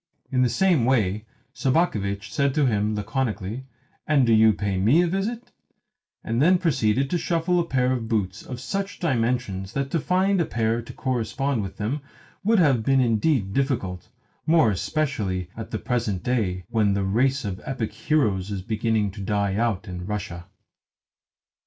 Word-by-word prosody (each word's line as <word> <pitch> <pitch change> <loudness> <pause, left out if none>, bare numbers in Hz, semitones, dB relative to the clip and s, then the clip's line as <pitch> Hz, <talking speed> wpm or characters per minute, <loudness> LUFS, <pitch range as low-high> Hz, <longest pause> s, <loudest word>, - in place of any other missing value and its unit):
In 130 -1 +2
the 125 - +3
same 165 +2 +3
way 110 -4 +1 0.3
Sobakevitch 110 - 0
said 140 -1 +1
to 150 -2 +3
him 105 -3 +1
laconically: 110 +1 -3 0.4
"And 145 -4 +4
do 115 - +3
you 110 0 +6
pay 100 0 -2
ME 125 - +4
a - - +1
visit," 205 +7 -3 0.7
and 115 +3 -1
then 180 +5 +5
proceeded 135 - +1
to 175 - +1
shuffle 170 +2 +1
a 170 - +1
pair 130 -4 +1
of 120 -3 -2
boots 100 -5 -1
of 125 -1 -7
such 195 +10 -3
dimensions 120 - -1
that 140 0 -2
to 165 - +1
find 185 +4 +2
a - - +1
pair 115 -1 0
to 115 - -10
correspond 130 +1 -1
with 95 - -6
them 115 +8 -2 0.4
would 220 +3 +3
have 140 - +4
been 135 +4 +3
indeed 115 -3 +1
difficult 115 -10 -1 0.4
more 155 -9 +5
especially 100 - -2
at 115 - -7
the - - -3
present 115 -7 -2
day, 100 -7 -1
when 105 -3 +2
the 100 - 0
race 125 +7 +1
of 95 -2 -4
epic 125 -5 -3
heroes 105 - 0
is 100 -3 -4
beginning 110 -1 0
to 100 +1 -9
die 100 -1 0
out 110 -1 -1
in 90 0 -6
Russia. 90 -5 -5
115 Hz, 170 wpm, -24 LUFS, 100-140 Hz, 0.7 s, you